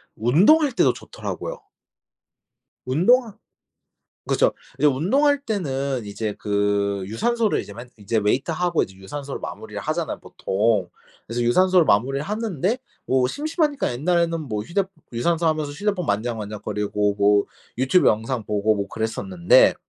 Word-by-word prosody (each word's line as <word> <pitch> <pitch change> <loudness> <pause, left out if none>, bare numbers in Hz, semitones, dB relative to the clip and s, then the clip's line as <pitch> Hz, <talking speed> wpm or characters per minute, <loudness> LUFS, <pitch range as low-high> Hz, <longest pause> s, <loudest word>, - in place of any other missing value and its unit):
운동할 205 - +4
때도 - - +3
좋더라고요. - - -6 1.3
운동하 215 - +3 0.9
그쵸. - - +3 0.3
이제 145 - +1
운동할 270 - +2
때는 140 - -2
이제 105 +1 -4
그 100 -1 0
유산소를 225 - 0
이제 - - -11
맨 120 +3 -10
이제 105 +2 -2
웨이트하고 160 - +1
이제 95 - -9
유산소를 140 +9 -6
마무리를 - - -7
하잖아요, - - -2
보통. 105 -1 0 0.4
그래서 120 +2 -3
유산소를 180 +8 +4
마무리를 135 +7 +2
하는데 210 - -1 0.3
뭐 130 -1 +2
심심하니까 300 - -1
옛날에는 165 +4 +1
뭐 105 -8 -4
휴대 195 - 0 0.3
유산소 165 +8 0
하면서 155 -2 0
휴대폰 190 +2 -2
만지작 115 +2 -1
만지작거리고 105 -1 -2
뭐 100 0 +4 0.3
유튜브 130 +8 +4
영상 115 +2 -1
보고 105 +1 +1
뭐 100 -1 -3
그랬었는데 100 -6 +3
130 Hz, 345 characters per minute, -23 LUFS, -, 1.3 s, 운동할